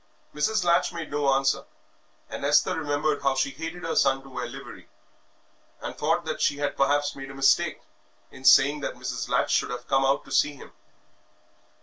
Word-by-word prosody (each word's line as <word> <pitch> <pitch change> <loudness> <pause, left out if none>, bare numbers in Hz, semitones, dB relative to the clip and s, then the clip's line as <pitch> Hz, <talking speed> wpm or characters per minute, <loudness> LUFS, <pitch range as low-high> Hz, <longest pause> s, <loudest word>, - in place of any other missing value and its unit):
Mrs. 215 +7 0
Latch 170 +1 +3
made 170 -2 -7
no 145 -1 +1
answer, 135 0 +1 0.6
and - - -7
Esther - - +3
remembered 145 -1 -1
how 135 -1 +1
she 135 +1 0
hated 165 +5 -7
her 165 - -2
son 135 -2 +2
to 135 - -14
wear 125 -2 -5
livery, 135 +1 -11 0.9
and - - -6
thought 165 +3 0
that 155 -1 -4
she 145 - +1
had 145 0 -2
perhaps 145 +1 +1
made 135 0 -8
a 135 - -10
mistake 135 0 +2 0.5
in 130 - -14
saying 140 +2 +6
that 145 - -4
Mrs. - - -5
Latch - - +1
should - - +1
have 125 0 -6
come 135 0 +2
out 135 +1 +1
to - - -14
see 145 - +2
him. - - -13
145 Hz, 190 wpm, -26 LUFS, 135-155 Hz, 0.9 s, saying